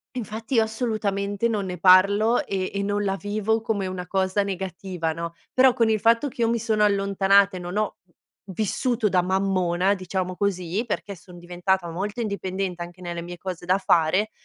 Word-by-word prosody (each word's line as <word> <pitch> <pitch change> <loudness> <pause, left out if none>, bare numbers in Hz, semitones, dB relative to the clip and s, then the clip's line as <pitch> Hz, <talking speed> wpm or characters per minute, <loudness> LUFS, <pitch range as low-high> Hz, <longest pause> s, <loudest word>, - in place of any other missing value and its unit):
infatti 225 +1 -4
io 225 - +5
assolutamente 215 -2 -1
non 210 -4 -1
ne 180 -1 -5
parlo 200 +6 +5
e 190 -1 -2
e 200 - -1
non 205 +1 -1
la 195 -1 0
vivo 215 +2 -1
come 210 -3 -1
una 185 -1 -5
cosa 190 +1 +1
negativa, 185 -3 -4
no. 170 +1 -6 0.2
Però 255 -1 +5
con 230 -3 +2
il 215 -1 +2
fatto 230 +6 +3
che 240 -2 -6
io 230 - +3
mi 235 0 +1
sono 215 -2 +1
allontanata 200 -1 +3
e - - -6
non 180 +3 -5
ho 215 -1 -1 0.5
vissuto 215 +3 -1
da 180 -1 +3
mammona, 185 0 +1
diciamo 185 -1 -3
così, 185 +1 -1
perché 205 -2 -4
sono 180 0 -15
diventata 175 +1 -1
molto 205 +6 -4
indipendente 190 -4 -3
anche 175 +1 -8
nelle 175 -1 -5
mie 175 +1 -8
cose 180 -1 -6
da 185 +2 +3
fare, 185 +3 +2
195 Hz, 185 wpm, -24 LUFS, 180-215 Hz, 0.5 s, io